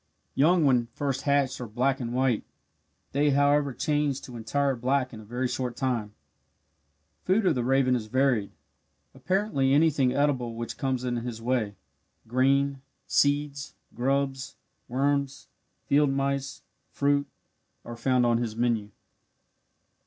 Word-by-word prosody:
Young 160 +4 +4
when 125 -4 +3
first 135 +2 -3
hatched 140 -3 +1
are 125 - -5
black 130 +5 0
and 120 -2 -4
white 125 -2 +1 0.7
they 145 +2 +2
however 145 0 +3
change 145 0 0
to 125 - -10
entire 135 +5 0
black 130 +2 0
in 110 - -8
a - - -11
very 120 +4 -2
short 125 -1 -3
time. 115 -6 -2 1.1
Food 195 +3 +2
of 180 - +4
the 125 - -1
raven 130 0 +3
is 110 -3 -3
varied, 130 -4 +1 0.6
apparently 185 -9 +1
anything 145 -4 +3
edible 130 -4 0
which 115 0 -5
comes 130 -2 -1
in 120 -1 -1
his 120 -1 -5
way 115 -4 -1 0.5
grain, 135 +3 +2 0.2
seeds, 145 -1 0 0.2
grubs, 135 +1 -1 0.3
worms, 140 +1 -1 0.4
field 145 0 +3
mice, 135 0 -2 0.3
fruit, 140 0 +1 0.6
are 120 - -7
found 125 +1 +2
on 120 -1 +2
his 115 -3 -3
menu. 115 -3 0
135 Hz, 135 wpm, -27 LUFS, 120-140 Hz, 1.1 s, Young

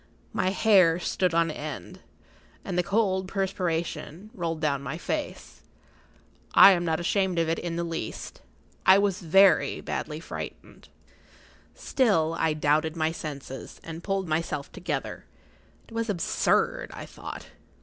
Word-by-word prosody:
My 185 - +1
hair 190 -4 +4
stood 180 -1 0
on 165 -1 +3
end, 150 -12 -7 0.7
and - - -3
the 180 - +3
cold 190 -1 0
perspiration 185 -1 -3
rolled 165 -6 -3
down 145 -3 0
my 140 - -5
face. - - -5 0.9
I 200 - +10
am 175 -2 +2
not 160 -1 0
ashamed 185 +1 0
of 165 -1 +2
it 165 - 0
in 170 -1 -4
the 170 - -1
least: 165 -9 -5 0.4
I 190 +1 +7
was 200 -1 +1
very 195 +2 +4
badly - - -4
frightened. - - -9 0.9
Still 165 - +1
I 160 -1 +2
doubted 155 +2 +1
my 160 -1 0
senses, 140 -4 -7
and 165 +1 -8
pulled 195 -2 -1
myself 155 -3 -2
together. 185 - -4 0.6
It - - -15
was 230 0 -2
absurd, 185 -5 +1
I - - -7
thought. - - -9
170 Hz, 140 wpm, -27 LUFS, 160-190 Hz, 0.9 s, I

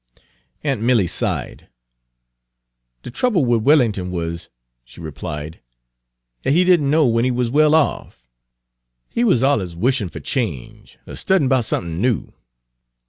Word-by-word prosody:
Aunt 135 -7 -1
Milly 115 -4 +3
sighed. - - -4 1.4
"De - - -8
trouble 185 - +1
wid 120 -2 +1
Wellin'ton 115 -10 +2
wuz," 85 -1 -5 0.4
she - - -17
replied, 75 0 -7 0.8
"dat 135 - 0
he 175 +4 +4
did 180 -1 +4
n' 140 - -1
know 155 +1 +3
when 115 -1 +2
he 130 - +1
wuz 125 -1 -1
well 155 +2 +4
off. 60 - -1 0.8
He 235 - 0
wuz 185 - +3
alluz 100 -12 0
wishin' 115 0 0
fer - - -8
change, 105 - -5
er - - -8
studyin' 190 -8 +1
'bout 130 -4 +2
somethin' 85 -4 -3
new." 120 -3 -1
120 Hz, 140 wpm, -20 LUFS, 90-145 Hz, 1.4 s, he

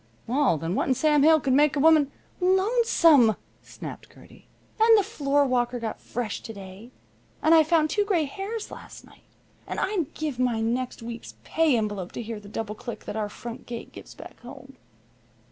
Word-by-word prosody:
"Well, 255 - +2
then, 165 +3 -3
what - - 0
in 260 - +2
Sam 300 +1 +3
Hill 315 +2 +6
could 265 -2 0
make 295 +2 +4
a - - 0
woman 305 -2 +5 0.2
" - - -34 0.2
"Lonesome!" 335 - +4 0.3
snapped - - -10
Gertie. - - -18 0.3
"And 450 0 +6
the 410 - +3
floorwalker 275 - 0
got 225 -2 -5
fresh 230 -2 -4
to 225 - -8
day. 195 +3 -11 0.5
And 315 - +5
I 325 - +8
found 315 -1 +2
two 415 - +2
gray 370 -7 +1
hairs 405 +8 -5
to - - -10 0.3
night. - - -20 0.5
And - - -4
I'd 375 -7 -1
give 300 -5 -4
my 245 -3 +1
next 240 +2 -2
week's 235 0 -8
pay 315 -6 +2
envelope 205 -4 -3
to 235 - -5
hear 225 -1 -6
the 205 -1 -13
double 215 0 -4
click 240 +2 -8
that - - -6
our 215 -1 -2
front 235 +4 -9
gate 235 -1 -7
gives - - -12
back - - -12
home." - - -12
260 Hz, 190 wpm, -25 LUFS, 230-315 Hz, 0.5 s, I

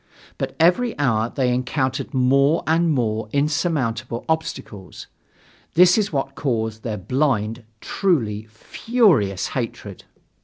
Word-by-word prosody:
But - - -3
every 180 +9 +3
hour 115 -5 +1
they 125 -2 0
encountered 130 +1 -2
more 140 +3 +2
and 165 +2 +2
more 110 -6 -1
insurmountable 140 -6 -1
obstacles. 105 - -4 0.7
This 180 +1 +6
is 210 -2 0
what 135 -2 -2
caused 110 -6 -2
their 110 -2 -4
blind, 115 0 -1 0.2
truly 115 - -1
furious 135 - +1
hatred. - - -6
130 Hz, 110 wpm, -21 LUFS, 110-160 Hz, 0.7 s, This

